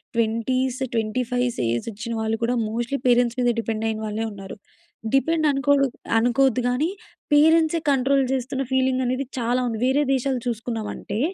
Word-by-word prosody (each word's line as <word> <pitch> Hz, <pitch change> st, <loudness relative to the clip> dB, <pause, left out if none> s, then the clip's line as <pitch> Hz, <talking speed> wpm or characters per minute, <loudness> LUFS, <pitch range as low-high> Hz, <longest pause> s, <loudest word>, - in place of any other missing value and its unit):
20స్, 240 Hz, +3 st, 0 dB, 0.2 s
25స్ 245 Hz, -, -1 dB
age 120 Hz, -, -2 dB
వచ్చిన 230 Hz, +3 st, -6 dB
వాళ్ళు 220 Hz, 0 st, -1 dB
కూడా 245 Hz, +1 st, 0 dB
మోస్ట్‌లీ 240 Hz, +4 st, -2 dB
పేరెంట్స్ 245 Hz, 0 st, +3 dB
మీద 245 Hz, -, +3 dB
డిపెండ్ 225 Hz, -1 st, -2 dB
అయిన 220 Hz, 0 st, -3 dB
వాళ్ళే 215 Hz, +1 st, -2 dB
ఉన్నారు. 195 Hz, 0 st, -9 dB, 0.6 s
డిపెండ్ 315 Hz, +3 st, +2 dB
అనుకొడు 280 Hz, 0 st, +2 dB, 0.3 s
అనుకోవద్దు 245 Hz, +2 st, +3 dB
కానీ 255 Hz, +6 st, +1 dB, 0.5 s
పేరెంట్సె 320 Hz, +2 st, +4 dB
కంట్రోల్ 270 Hz, 0 st, +3 dB
చేస్తున్న 265 Hz, +1 st, -2 dB
ఫీలింగ్ 260 Hz, 0 st, +2 dB
అనేది 255 Hz, +2 st, -1 dB
చాలా 245 Hz, +1 st, 0 dB
ఉంది. 225 Hz, -2 st, -2 dB
వేరే 265 Hz, +3 st, +3 dB
దేశాలు 265 Hz, -1 st, 0 dB
చూసుకున్నామంటే, 225 Hz, -2 st, -4 dB
250 Hz, 145 wpm, -23 LUFS, 225-270 Hz, 0.6 s, పేరెంట్సె